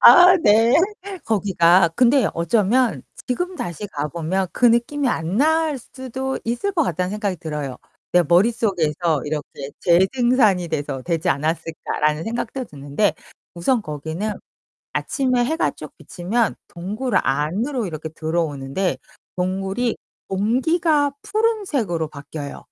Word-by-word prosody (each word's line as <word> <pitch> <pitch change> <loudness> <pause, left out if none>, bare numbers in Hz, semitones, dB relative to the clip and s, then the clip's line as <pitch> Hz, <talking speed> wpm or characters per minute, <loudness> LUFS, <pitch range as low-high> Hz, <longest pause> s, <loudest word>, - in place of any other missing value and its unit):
아, 360 +1 +9
네. 230 - +4 0.5
거기가 185 -4 +4
근데 255 +2 +4
어쩌면 215 +8 +2 0.2
지금 355 +8 -2
다시 175 +4 -5
가 150 -6 -4
보면 170 +4 -2
그 245 - +3
느낌이 245 +4 +2
안 165 -2 -1
날 315 +1 +2
수도 260 +2 -5
있을 240 +13 -1
것 335 -4 +2
같다는 180 - -1
생각이 205 -3 -2
들어요. 150 -5 -5 0.4
'내 180 - +5
머릿속에서 175 - +1
이렇게 145 -2 -5
재생산이 195 0 +3
돼서 140 -4 -3
되지 170 0 -1
않았을까.'라는 155 0 -1
생각도 240 +3 -3
드는데 145 - -1 0.4
우선 225 +8 +1
거기는 160 +8 -4 0.6
아침에 255 -3 0
해가 320 +5 0
쭉 - - -11
비치면 210 +6 -1
동굴 210 +9 -4
안으로 200 - -1
이렇게 160 -1 -6
들어오는데 155 0 -2 0.4
동굴이 195 +6 -1 0.3
공기가 285 - +1
푸른색으로 325 - 0
바뀌어요. 145 0 -7
195 Hz, 285 characters per minute, -21 LUFS, 160-250 Hz, 0.6 s, 아